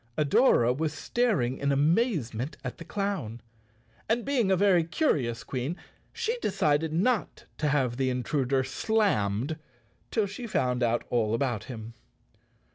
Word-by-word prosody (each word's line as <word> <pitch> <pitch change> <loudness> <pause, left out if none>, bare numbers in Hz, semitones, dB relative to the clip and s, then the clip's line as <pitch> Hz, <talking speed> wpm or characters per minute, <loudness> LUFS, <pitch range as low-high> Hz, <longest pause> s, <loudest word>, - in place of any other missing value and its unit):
Adora 140 - +4
was 155 +1 -1
staring 155 - 0
in 140 0 +1
amazement 145 - +1
at - - -6
the - - -7
clown, 170 - -3 0.7
and 235 +1 +1
being 260 -7 +1
a 190 - +3
very 185 -3 +4
curious 140 - 0
Queen 135 +7 -3 0.3
she 470 +2 -2
decided 155 - +1
not 200 +7 0
to 150 - +1
have 130 -4 +1
the 130 -1 +1
intruder 130 +1 0
slammed 135 - 0 0.5
till 220 -3 +1
she 210 +5 -6
found 125 - 0
out 120 0 +1
all 115 -2 +1
about 120 -3 -1
him. 115 -2 -8
145 Hz, 135 wpm, -28 LUFS, 125-200 Hz, 0.7 s, Adora